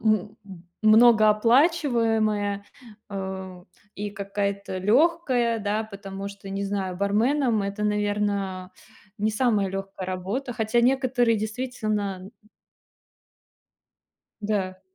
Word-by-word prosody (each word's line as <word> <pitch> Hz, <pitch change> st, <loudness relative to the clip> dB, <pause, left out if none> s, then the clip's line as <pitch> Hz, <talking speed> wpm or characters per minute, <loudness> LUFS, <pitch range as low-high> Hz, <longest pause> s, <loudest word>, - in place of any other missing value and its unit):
м, 215 Hz, -1 st, +1 dB, 0.5 s
многооплачиваемая, 220 Hz, -, +4 dB, 0.4 s
а, 190 Hz, -2 st, -6 dB, 0.3 s
и 205 Hz, +1 st, -4 dB
какая-то 200 Hz, -1 st, -3 dB
лёгкая, 245 Hz, -, +2 dB
да, 210 Hz, +2 st, -1 dB
потому 200 Hz, -1 st, -7 dB
что, 200 Hz, -1 st, -11 dB
не 195 Hz, +1 st, -3 dB
знаю, 195 Hz, -2 st, -3 dB
барменом 220 Hz, +4 st, +1 dB
это, 200 Hz, +1 st, -3 dB
наверно, 205 Hz, -3 st, -1 dB, 0.5 s
не 215 Hz, +1 st, +1 dB
самая 215 Hz, -3 st, +1 dB
лёгкая 195 Hz, -1 st, -6 dB
работа. 200 Hz, +8 st, -3 dB
Хотя 225 Hz, 0 st, +1 dB
некоторые 245 Hz, -2 st, +2 dB
действительно, 215 Hz, -3 st, -3 dB
м. 190 Hz, -, -11 dB, 2.1 s
Да. 195 Hz, -3 st, -2 dB
210 Hz, 90 wpm, -25 LUFS, 195-230 Hz, 2.1 s, многооплачиваемая